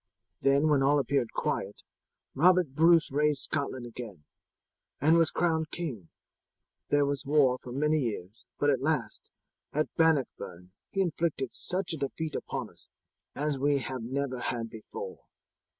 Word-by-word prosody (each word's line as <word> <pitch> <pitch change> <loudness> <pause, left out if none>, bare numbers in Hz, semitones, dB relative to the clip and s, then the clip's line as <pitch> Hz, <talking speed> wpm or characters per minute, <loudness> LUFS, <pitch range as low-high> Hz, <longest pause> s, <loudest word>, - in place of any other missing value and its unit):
Then 140 +2 +4
when 145 -3 +3
all 140 +2 +4
appeared 140 -4 0
quiet, - - -3 0.5
Robert 180 +1 +4
Bruce 165 +3 +4
raised 150 0 +2
Scotland 140 -4 -2
again, 110 -8 -9 0.8
and 155 +4 +4
was 165 -1 +4
crowned 160 -2 0
king. 125 - -5 0.8
There 145 0 +3
was 140 -1 -2
war 135 -3 +3
for 125 - -10
many 150 +4 +1
years, 110 -5 -5
but 145 0 +3
at 130 -2 0
last, 155 +2 -2 0.4
at 155 +1 -1
Bannockburn 130 - 0 0.2
he 195 - 0
inflicted 165 -5 -1
such 185 -1 -2
a - - -3
defeat 150 +2 -3
upon - - -4
us - - -17 0.5
as 145 -1 -1
we 145 +1 +3
have 130 -2 -4
never 130 +2 -2
had 115 -2 -3
before. 110 -1 -8
140 Hz, 145 wpm, -29 LUFS, 130-155 Hz, 0.8 s, Then